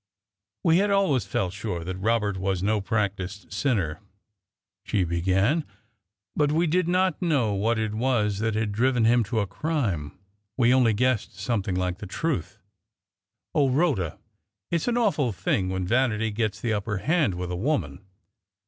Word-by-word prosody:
"We 165 0 +5
had 205 +1 +2
always 155 - +2
felt 95 -2 -1
sure 95 -4 -4
that 95 +2 -4
Robert 105 0 +1
was 95 -1 -1
no 105 +1 +1
practised 100 -2 -3
sinner," 100 - 0 0.8
she 95 - 0
began; 95 - +1 0.7
"but 145 -1 +2
we 165 +3 +2
did 175 +2 +1
not 185 -1 +1
know 140 - +1
what 110 +4 +1
it 110 -1 -1
was 110 -4 0
that 110 0 0
had 110 -1 0
driven 120 +2 +2
him 120 +1 +4
to 110 +2 0
a - - 0
crime 100 - -2 0.4
we 120 -1 +4
only 125 -4 +4
guessed 125 -4 0
something 100 -2 -1
like 90 0 -1
the 105 - -7
truth. 145 - -2 1.0
O 145 -5 +3
Rhoda, 125 - +1 0.5
it's 170 +4 0
an 240 0 +1
awful 185 - +2
thing 95 0 -1
when 95 -1 -2
vanity 115 0 +1
gets 110 -1 -2
the 110 +1 -1
upper 105 0 -2
hand 145 - +1
with 90 0 -4
a - - -2
woman! 95 - -2
110 Hz, 160 wpm, -26 LUFS, 95-135 Hz, 1.0 s, We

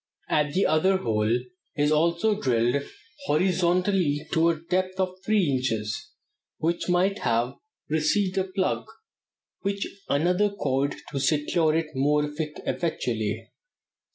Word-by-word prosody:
At 150 -1 +1
the 190 - +3
other 155 +5 +3
end 190 - 0
a - - -11
hole 110 0 +1 0.4
is 150 0 +2
also 170 +7 +2
drilled 120 +2 +2 0.5
horizontally 180 -2 +2
to 165 +1 +4
a 165 -2 0
depth 185 +3 -1
of 185 -1 0
three 210 -3 +3
inches, 115 -6 -1 0.5
which 170 +2 -1
might 185 +3 +2
have 115 +2 +1 0.3
received 185 +5 +1
a 185 - 0
plug, 185 0 -1 0.7
with 200 0 -1 0.3
another 180 +8 +2
cord 140 -7 -1 0.2
to 140 - -2
secure 155 +3 +2
it 165 -1 0
more 150 +3 +2
effectually. 125 - -3
155 Hz, 125 wpm, -26 LUFS, 140-185 Hz, 0.7 s, to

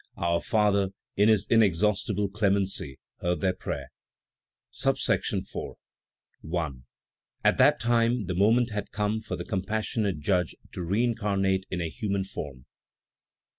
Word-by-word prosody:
Our 85 0 +1
Father, 100 -4 +2 0.2
in 105 +2 +4
his 105 -2 +4
inexhaustible 105 -1 +2
clemency, 100 -8 0 0.2
heard 90 0 0
their 95 -2 +2
prayer. 90 - -5 0.8
IV. - - +2 1.4
1. 80 -6 -3 0.6
At - - +4
that - - +6
time 115 -1 +2
the 90 - -2
moment 115 +6 +3
had 105 0 -3
come 105 +1 -1
for 110 - -4
the - - -6
compassionate 105 - -1
Judge 90 +4 0 0.2
to - - -5
reincarnate 100 -1 0
in 90 -2 -2
a 85 - -1
human 100 +2 -2
form; 70 -8 -7
2. - - -23
100 Hz, 130 wpm, -27 LUFS, 90-110 Hz, 1.4 s, that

